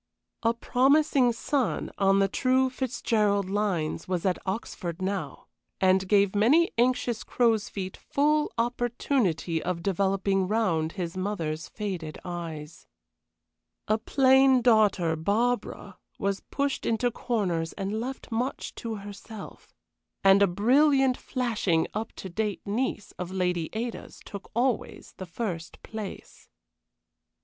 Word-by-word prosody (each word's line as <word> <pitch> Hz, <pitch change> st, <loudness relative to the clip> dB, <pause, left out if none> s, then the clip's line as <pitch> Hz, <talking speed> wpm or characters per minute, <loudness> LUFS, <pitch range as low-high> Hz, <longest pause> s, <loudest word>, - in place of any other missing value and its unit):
A 230 Hz, 0 st, +2 dB
promising 265 Hz, +1 st, +3 dB
son, 255 Hz, +2 st, -1 dB
on 195 Hz, 0 st, +4 dB
the 195 Hz, 0 st, +4 dB
true 260 Hz, +5 st, +2 dB
Fitzgerald 215 Hz, -6 st, 0 dB
lines, 190 Hz, -7 st, -1 dB
was 180 Hz, -1 st, -2 dB
at 185 Hz, -2 st, +1 dB
Oxford 190 Hz, -3 st, -4 dB
now, 190 Hz, 0 st, -3 dB, 0.3 s
and 190 Hz, 0 st, +3 dB
gave 200 Hz, -1 st, +3 dB
many 280 Hz, +12 st, +4 dB
anxious 240 Hz, -1 st, +1 dB
crows' 225 Hz, -4 st, +1 dB
feet 190 Hz, -2 st, -5 dB
full 300 Hz, +1 st, +1 dB
opportunity 235 Hz, -, 0 dB
of 175 Hz, -1 st, -3 dB
developing 195 Hz, 0 st, +1 dB
round 175 Hz, -7 st, 0 dB
his 175 Hz, -3 st, -4 dB
mother's 175 Hz, -5 st, -3 dB
faded 185 Hz, -7 st, -5 dB
eyes. 165 Hz, -3 st, -7 dB, 1.0 s
A 215 Hz, +1 st, +2 dB
plain 265 Hz, +1 st, +4 dB
daughter, 210 Hz, -8 st, +4 dB
Barbara, 225 Hz, +9 st, -1 dB, 0.2 s
was 200 Hz, -2 st, -1 dB
pushed 280 Hz, -1 st, -1 dB
into 235 Hz, +2 st, +1 dB
corners 185 Hz, -10 st, -1 dB
and 200 Hz, +2 st, -3 dB
left 260 Hz, +2 st, -6 dB
much 245 Hz, +4 st, -2 dB
to 230 Hz, -1 st, -4 dB
herself. 205 Hz, +1 st, -10 dB, 0.5 s
And 195 Hz, +1 st, +6 dB
a 200 Hz, -, +6 dB
brilliant, 265 Hz, +7 st, +4 dB
flashing, 225 Hz, -13 st, 0 dB
up 220 Hz, +2 st, -3 dB
to -, -, -8 dB
date 210 Hz, +2 st, -3 dB
niece 215 Hz, 0 st, -2 dB
of 180 Hz, -1 st, -4 dB
Lady 180 Hz, -3 st, -1 dB
Ada's 230 Hz, +2 st, -5 dB
took 200 Hz, -1 st, -9 dB
always 245 Hz, -1 st, -1 dB
the 185 Hz, -, -7 dB
first 170 Hz, -3 st, -5 dB
place. 215 Hz, -3 st, -8 dB
205 Hz, 120 wpm, -27 LUFS, 185-245 Hz, 1.0 s, And